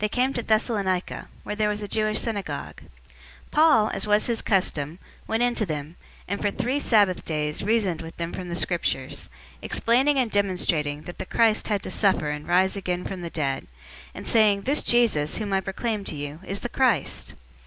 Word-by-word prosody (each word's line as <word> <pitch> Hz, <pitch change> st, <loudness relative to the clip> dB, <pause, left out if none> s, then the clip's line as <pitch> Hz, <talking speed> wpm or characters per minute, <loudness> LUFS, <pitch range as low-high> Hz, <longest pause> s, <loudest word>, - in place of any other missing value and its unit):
017:002 215 Hz, -2 st, -1 dB, 0.8 s
Paul, 300 Hz, -9 st, +5 dB
as 195 Hz, -, -2 dB
was 210 Hz, 0 st, +3 dB
his 235 Hz, -2 st, 0 dB
custom, 165 Hz, -5 st, 0 dB, 0.3 s
went 225 Hz, +2 st, +1 dB
in 245 Hz, 0 st, +2 dB
to 235 Hz, -, 0 dB
them, 155 Hz, -3 st, -4 dB, 0.3 s
and 200 Hz, +2 st, -3 dB
for 205 Hz, -, +2 dB
three 255 Hz, +7 st, -1 dB
Sabbath 205 Hz, -9 st, +3 dB
days 150 Hz, -1 st, -2 dB
reasoned 205 Hz, -6 st, +1 dB
with 165 Hz, 0 st, -9 dB
them 170 Hz, 0 st, -4 dB
from 180 Hz, -1 st, -6 dB
the 170 Hz, -, -3 dB
Scriptures, 170 Hz, -7 st, -1 dB, 0.3 s
017:003 -, -, -28 dB
explaining 265 Hz, +5 st, +3 dB
and 245 Hz, -4 st, +1 dB
demonstrating 165 Hz, -7 st, 0 dB
that 175 Hz, -, -9 dB
the -, -, -3 dB
Christ 225 Hz, -2 st, +2 dB
had 205 Hz, -3 st, 0 dB
to -, -, -5 dB
suffer 190 Hz, -7 st, +2 dB
and 150 Hz, 0 st, -6 dB
rise 185 Hz, +2 st, +3 dB
again 180 Hz, -2 st, -3 dB
from 190 Hz, -2 st, -5 dB
the 170 Hz, -, -5 dB
dead, 140 Hz, -5 st, -2 dB, 0.5 s
and -, -, -8 dB
saying, 210 Hz, -3 st, +4 dB
"This 280 Hz, +3 st, +2 dB
Jesus, 220 Hz, -12 st, +2 dB
whom 210 Hz, -3 st, -3 dB
I 190 Hz, -, +2 dB
proclaim 205 Hz, +2 st, -3 dB
to -, -, -5 dB
you, 145 Hz, +1 st, -6 dB
is 195 Hz, +1 st, -4 dB
the 245 Hz, -, -3 dB
Christ." 250 Hz, -4 st, +1 dB
200 Hz, 165 wpm, -25 LUFS, 170-225 Hz, 0.8 s, Paul